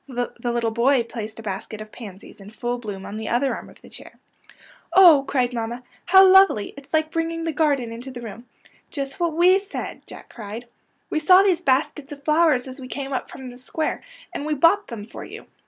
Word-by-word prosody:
The 245 -2 -4
little 235 -1 -1
boy 240 +3 +3
placed 220 -2 -7
a 225 - -9
basket 205 +1 -6
of 215 0 -9
pansies 210 -2 -11
in 195 +1 -12
full 240 +2 -4
bloom 205 -5 -7
on 205 - -7
the 220 0 -5
other 260 +3 +1
arm - - -8
of - - -18
the - - -14
chair. - - -12 0.5
" - - -23 0.3
Oh," 340 -6 +8
cried 250 -3 0
mamma, 235 +1 -4
" - - -33
how 380 +2 +8
lovely! 380 - +5
It's 280 -1 -14
like 315 0 +1
bringing 330 0 -2
the 325 - -1
garden 285 -6 0
into 240 +3 -8
the 245 -2 -9
room." 230 +2 -9 0.2
'' - - -32
Just 275 0 -5
what 340 -2 0
we 365 +3 +5
said," 390 0 -7
Jack - - -12
cried. 220 +1 -7
^' - - -24 0.5
We 310 - +1
saw 365 +5 +6
these 365 -4 +2
baskets 280 -1 0
of 285 -1 -9
flowers 305 -4 +3
as 260 +2 -9
we 255 - -8
came 275 +1 -5
up 260 - -3
from 260 -2 -9
the 245 - -13
square, 310 +5 -3 0.3
and - - -4
we 305 0 -1
bought 335 +8 +3
them 220 -3 -7
for - - -10
you. - - -10
260 Hz, 230 wpm, -23 LUFS, 235-315 Hz, 0.5 s, Oh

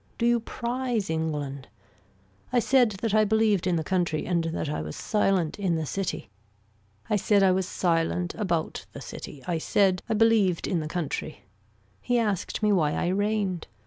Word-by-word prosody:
Do 235 - 0
you 240 0 +4
prize 235 -3 -2
England. 145 -4 -3 0.8
I 250 - +2
said 245 0 +4
that 225 -3 0
I 215 0 +5
believed 215 -3 +2
in 180 - +2
the 160 - 0
country 175 -3 0
and 170 -2 0
that 165 -1 -2
I 145 - -2
was 75 0 -6
silent 195 -5 0
in 185 -4 +1
the 160 -1 -2
city. 185 - -4 0.8
I 210 - +2
said 200 0 +3
I 190 - +5
was 185 0 0
silent 175 0 0
about 175 -7 -2
the - - -8
city, 135 - -9
I 170 -2 -1
said 190 +2 +2
I 220 - +1
believed 215 -5 +3
in 180 - 0
the 155 - -4
country. 155 -2 -4 0.6
He 245 - +1
asked 210 -2 -1
me 210 - +4
why 155 -6 +2
I 175 - 0
reigned. 200 -2 -1
185 Hz, 175 wpm, -26 LUFS, 165-215 Hz, 0.8 s, I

